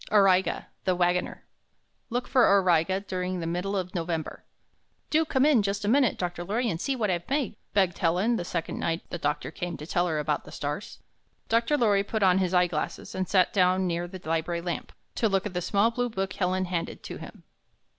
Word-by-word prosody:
AURIGA, 190 Hz, -3 st, +4 dB, 0.2 s
THE 185 Hz, -2 st, +2 dB
WAGONER 175 Hz, 0 st, 0 dB, 0.6 s
Look 245 Hz, +1 st, -2 dB
for 255 Hz, -2 st, +4 dB
Auriga 185 Hz, -1 st, +3 dB
during 185 Hz, -2 st, -3 dB
the 165 Hz, -, -3 dB
middle 180 Hz, +4 st, -2 dB
of 180 Hz, -1 st, -3 dB
November 165 Hz, -3 st, -3 dB, 0.7 s
"Do 315 Hz, +1 st, +3 dB
come 270 Hz, -3 st, +2 dB
in 290 Hz, -7 st, +5 dB
just 200 Hz, +1 st, -2 dB
a -, -, -1 dB
minute, 255 Hz, +1 st, +3 dB
Dr. 175 Hz, -1 st, -3 dB
Lorry, 225 Hz, +5 st, 0 dB
and 165 Hz, -, -4 dB
see 275 Hz, -, 0 dB
what 215 Hz, -6 st, 0 dB
I've 175 Hz, +2 st, -3 dB
made," 275 Hz, -5 st, 0 dB, 0.2 s
begged 190 Hz, -4 st, +2 dB
Helen, 180 Hz, +8 st, +2 dB
the 175 Hz, -, -2 dB
sec 170 Hz, -1 st, -3 dB
ond -, -, -5 dB
night 165 Hz, 0 st, -2 dB
the 175 Hz, -, -4 dB
doctor 150 Hz, 0 st, -2 dB
came 175 Hz, 0 st, -5 dB
to 150 Hz, -, -8 dB
tell 175 Hz, +2 st, +1 dB
her 160 Hz, -3 st, -1 dB
about 150 Hz, 0 st, -1 dB
the -, -, -12 dB
stars. 145 Hz, +7 st, -5 dB, 0.5 s
Dr. 230 Hz, +6 st, +2 dB
Lorry 210 Hz, -6 st, +3 dB
put 215 Hz, +1 st, -2 dB
on 185 Hz, 0 st, +5 dB
his 185 Hz, -2 st, 0 dB
eye 180 Hz, -1 st, +4 dB
glasses 160 Hz, -3 st, -4 dB
and 185 Hz, -1 st, -2 dB
sat 185 Hz, -2 st, +3 dB
down 185 Hz, -1 st, +3 dB
near 175 Hz, 0 st, -1 dB
the 185 Hz, +1 st, -9 dB
library 165 Hz, +1 st, -1 dB
lamp, 175 Hz, 0 st, -4 dB, 0.2 s
to 225 Hz, -, +1 dB
look 195 Hz, 0 st, +1 dB
at 205 Hz, -, -4 dB
the 180 Hz, -, -1 dB
small 205 Hz, +5 st, +2 dB
blue 245 Hz, +1 st, -1 dB
book 195 Hz, -3 st, -3 dB
Helen 185 Hz, 0 st, 0 dB
handed 175 Hz, -2 st, -4 dB
to -, -, -6 dB
him. -, -, -11 dB
185 Hz, 215 wpm, -27 LUFS, 175-210 Hz, 0.7 s, in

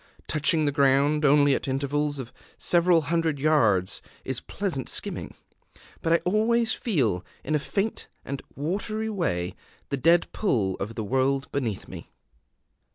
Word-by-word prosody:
Touching 155 Hz, +1 st, +1 dB
the 145 Hz, -, +2 dB
ground 140 Hz, +1 st, +3 dB
only 145 Hz, -1 st, +5 dB
at -, -, -2 dB
intervals 145 Hz, +2 st, -1 dB
of 130 Hz, -3 st, -7 dB, 0.2 s
several 175 Hz, -1 st, +4 dB
hundred 165 Hz, 0 st, 0 dB
yards 115 Hz, -11 st, +2 dB, 0.2 s
is -, -, -2 dB
pleasant -, -, -3 dB
skimming; -, -, -4 dB, 0.7 s
but 165 Hz, -, 0 dB
I -, -, +7 dB
always 220 Hz, +4 st, +2 dB
feel, 120 Hz, -, 0 dB, 0.2 s
in 155 Hz, -, -2 dB
a 150 Hz, -, +3 dB
faint 200 Hz, +8 st, -2 dB, 0.2 s
and 140 Hz, 0 st, -4 dB
watery 210 Hz, +8 st, -2 dB
way, 90 Hz, -, -1 dB, 0.3 s
the 140 Hz, -, -1 dB
dead 165 Hz, +6 st, +4 dB
pull 110 Hz, -, 0 dB
of 105 Hz, +4 st, -5 dB
the 110 Hz, -, -3 dB
world 135 Hz, +5 st, 0 dB
beneath 120 Hz, -8 st, -3 dB
me. -, -, -10 dB
145 Hz, 145 wpm, -26 LUFS, 135-170 Hz, 0.7 s, I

